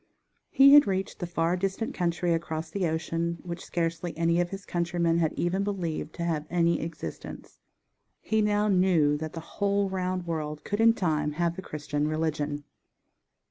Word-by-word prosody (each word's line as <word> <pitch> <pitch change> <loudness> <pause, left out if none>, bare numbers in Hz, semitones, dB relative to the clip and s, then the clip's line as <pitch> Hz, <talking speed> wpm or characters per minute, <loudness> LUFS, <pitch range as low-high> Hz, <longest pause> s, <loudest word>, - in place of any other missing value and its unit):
_ - - -41 0.5
He 275 +1 +7
had 290 -5 +8
reached 190 0 -2
the 175 - -3
far 170 0 0
distant 195 +4 -2
country 175 -1 0
across 160 -1 -3
the 190 -2 0
ocean, 165 +1 -2
which 170 -1 -6
scarcely 165 0 -3
any 170 +1 +2
of 175 - -1
his 195 +1 -7
countrymen 170 -1 0
had 160 -2 +2
even 185 +3 0
believed 175 -6 -3
to 170 - -4
have 160 -3 -1
any 170 -1 +2
existence. 165 +1 -7 0.6
He 220 0 0
now 210 0 +2
knew 180 -7 +3
that 155 +1 -5
the 165 - -5 0.2
whole 200 -1 +1
round 185 -1 -2
world 155 -3 -4
could 205 +2 -1
in 230 0 +6
time 150 -7 0
have 170 +2 0
the 190 - -6
Christian 150 -3 -3
religion. 150 -2 -2
170 Hz, 175 wpm, -28 LUFS, 160-190 Hz, 0.6 s, had